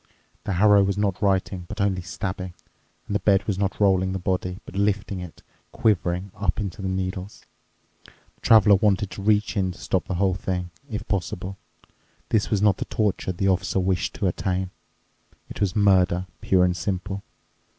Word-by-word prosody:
The 100 - -1
harrow 100 +2 +5
was 100 0 0
not 100 -2 0
writing 95 -2 0
but 105 +3 -7
only 100 -2 +1
stabbing, 95 0 -5 0.5
and - - -5
the 100 - +2
bed 100 -3 +3
was 100 -3 -1
not 100 -1 -1
rolling 95 -2 +3
the - - -1
body, 90 0 -2
but - - -11
lifting 100 -1 0
it, 90 -3 -9 0.3
quivering, 95 -3 0
up 100 -1 -1
into 100 -2 -4
the 95 - -2
needles. 95 +1 -4 0.6
The - - -25
Traveler 110 -2 +6
wanted 100 -1 +1
to 95 - -7
reach 105 +1 +2
in 95 -3 +1
to - - -15
stop 95 - -1
the 95 - -2
whole 95 +1 +2
thing, 90 -1 -3 0.2
if 105 -3 -5
possible. 95 -1 -3 0.7
This 110 -2 +1
was 105 -2 +1
not 105 -3 +4
the - - -3
torture 105 -3 -1
the 95 +2 0
Officer 95 0 +1
wished 95 0 0
to 105 - -2
attain. 95 0 -1 0.8
It - - -8
was 100 -3 +1
murder, 95 -3 +3 0.2
pure 90 -1 +4
and 90 -1 +1
simple. 95 +1 -3
95 Hz, 180 wpm, -24 LUFS, 90-100 Hz, 0.8 s, Traveler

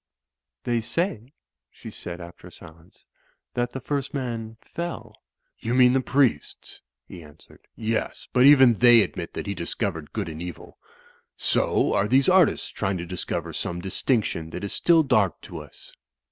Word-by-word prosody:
"They 120 -1 0
say," 130 - -2 0.4
she - - -11
said, 85 0 -7
after 85 0 -11
a - - -13
silence, 80 +3 -16 0.5
"that 120 0 -1
the 130 - -5
first 140 0 -3
man 115 -4 -4
fell." 140 -12 -7 0.4
"You 115 +2 -2
mean 125 -1 +6
the 135 - +2
priests?" 135 -1 -1 0.3
he 90 - -10
answered. 75 0 -18
"Yes, 110 0 -3
but 125 +1 +6
even 135 -4 +7
they 120 -1 +7
admit 85 - -6
that - - -5
he 100 - -2
discovered 85 -3 -4
good 105 -5 -3
and 80 0 -7
evik 90 -1 -8 0.6
So - - +1
are 100 - +2
these 130 +4 +3
artists 185 -2 +3
trying 95 0 -2
to 85 - -5
discover 90 +1 -4
some 85 - -4
distinction 95 -3 -1
that - - -7
is 100 - -3
still 165 -2 +4
dark 110 - +2
to - - -8
us." - - -14
115 Hz, 160 wpm, -25 LUFS, 90-130 Hz, 0.6 s, even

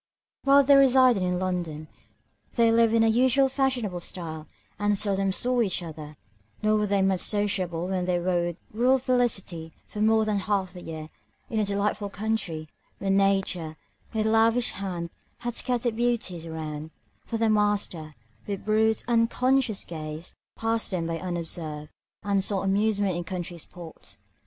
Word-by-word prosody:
While 280 +1 +7
they 280 +1 +6
resided 260 -5 +5
in 180 0 0
London, 175 -4 -3 0.7
they 230 -1 +4
lived 230 0 +4
in 225 - +5
the - - +4
usual 260 +3 +4
fashionable 255 -9 0
style, 160 -3 -6 0.3
and 205 0 +2
seldom 195 -1 +1
saw 245 +5 +2
each 190 -5 0
other; 155 -2 -8 0.5
nor 215 0 +3
were 210 -1 +1
they 200 -1 +2
much 195 - +3
more 190 - +1
sociable 185 -5 0
when 185 -1 -1
they 180 -1 +1
wooed 175 -1 0 0.2
rural 250 +4 +4
felicity 235 -10 0
for 210 - -6
more 220 0 +4
than 210 -2 0
half 190 -2 -1
the 180 - -9
year, 160 -2 -7 0.4
in 220 - 0
a 210 - +2
delightful 200 +1 -1
country, 200 -7 -3 0.3
where 195 -1 -1
Nature, 195 -5 +1 0.3
with 220 -1 0
lavish 225 +2 +3
hand, 175 -4 -5 0.3
had 240 0 -3
scattered 240 -1 -1
beauties 225 -8 -1
around; 155 -1 -5 0.3
for 230 - -3
the 225 0 +2
master, 205 -7 0 0.3
with 200 -2 -4
brute, 220 +1 +2
unconscious 240 0 +2
gaze, 155 0 -6 0.2
passed 225 0 -1
them 180 -4 -2
by 165 0 -3
unobserved, 165 -4 -4 0.3
and 200 -1 +1
sought 195 -1 0
amusement 200 -1 +1
in 175 - -3
country 175 0 -5
sports. 170 0 -9
200 Hz, 155 wpm, -26 LUFS, 175-225 Hz, 0.7 s, While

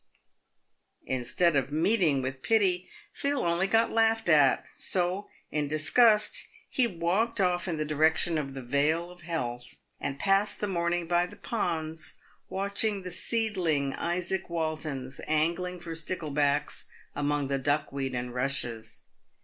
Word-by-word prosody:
Instead 130 +6 +1
of 135 0 +1
meeting 160 - +2
with 130 0 -4
pity, 190 -4 +2 0.2
Phil 280 -6 -1
only 170 +3 +1
got 225 +3 +3
laughed 225 -3 +2
at; 145 -5 +5
so, 185 +2 -1 0.2
in 150 -1 0
disgust, 210 +9 +3 0.2
he 250 -2 +2
walked 195 +5 0
off 180 -1 +1
in 170 -3 -2
the 155 - -1
direction 160 +2 +2
of 135 -2 -5
the 135 - -6
Vale 150 +7 +1
of 180 -1 -14
Health, 125 -7 -4 0.2
and 135 - -3
passed 195 +5 +2
the - - 0
morn 170 -3 0
ing 175 -1 -1
by 175 +1 +2
the 205 - -13
ponds, 165 -7 -3 0.3
watching 200 +1 -1
the 180 - -5
seedling 180 - +1
Izaac 180 +2 -2
Waltons 155 -5 -3
angling 170 +4 0
for 165 -1 -6
sticklebacks 150 -3 -1 0.3
among 145 -1 0
the 135 0 -1
duckweed 140 -1 -1
and 125 0 -4
rushes. 125 -4 -3
165 Hz, 140 wpm, -28 LUFS, 145-185 Hz, 0.3 s, at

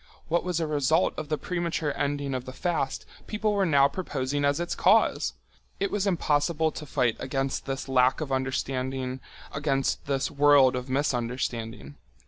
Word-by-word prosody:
What 170 +2 +1
was 180 -2 -1
a 165 - 0
result 155 +3 +2
of 155 -2 -6
the 155 - 0
premature 165 -3 -2
ending 140 -1 -1
of 130 -1 -3
the 130 - -8
fast 165 -3 -2 0.2
people 215 0 0
were 200 -2 +2
now 140 -3 +5
proposing 145 -3 -3
as 140 +1 +2
its 175 0 -2
cause! - - +3 0.5
It 200 - 0
was 205 -1 0
impossible 160 -2 +1
to 150 - -8
fight 120 -3 +1
against 135 +1 -2
this 135 0 -3
lack 130 -1 +3
of 150 -3 -4
understanding, 130 -1 -2 0.3
against 140 -2 -1
this 135 -1 0
world 140 -3 +5
of 125 +1 -4
misunderstanding. 120 - -2
140 Hz, 160 wpm, -27 LUFS, 130-160 Hz, 0.5 s, now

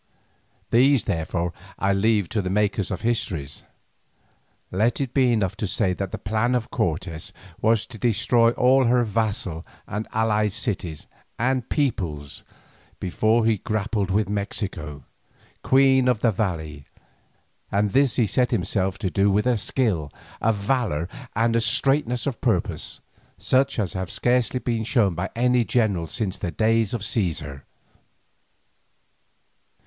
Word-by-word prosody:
These, 130 +2 +4
therefore, 85 +1 -2 0.2
I 100 0 +1
leave 105 -1 +2
to 110 - 0
the 90 - -3
maker 105 +1 +1
of 95 - -3
histories. 90 - -2 1.1
Let 110 +6 +1
it 135 -3 -3
be 130 -3 +3
enough 105 -6 0
to 105 - -2
say 95 0 0
that 95 0 -4
the - - -4
plan 110 +4 0
of 120 -2 -2
Cortes 85 -1 -2 0.3
was 110 0 +2
to 110 - -11
destroy 115 +1 +3
all 130 +2 +4
her 120 +1 +3
vassal 105 -6 -2 0.2
and 105 +2 -4
allied 105 -2 +1
cities 95 - -3 0.3
and 130 0 0
peoples 85 - -2 0.6
before 110 +5 +1
he 110 -3 +2
grappled 105 -1 -1
with 100 +2 +1
Mexico, 100 - -3 0.6
queen 130 -1 +4
of 125 -4 +2
the 115 - +3
valley, 80 -8 -3 0.8
and 100 0 +1
this 135 +2 +3
he 120 - +3
set 125 +4 +1
himself 95 -2 -1
to 95 - -3
do 100 +1 +3
with 105 +3 +2
a 125 -1 +3
skill, 100 - -1 0.3
a 115 - +3
valour, 100 - -1 0.3
and 115 +2 +2
a 115 - +3
straightness 125 +1 +1
of 135 -5 -3
purpose, 110 -9 -1 0.4
such 130 +1 +1
as 100 -6 -1
have 95 -2 -4
scarcely 125 +1 +1
been 115 -3 -1
shown 110 -5 +2
by 90 +4 -3
a 125 +1 +3
general 105 -8 0
since 100 0 -3
the 90 - -2
days 110 +5 +1
of 105 -3 -4
Caesar. 80 - -2
110 Hz, 145 wpm, -24 LUFS, 95-120 Hz, 1.1 s, These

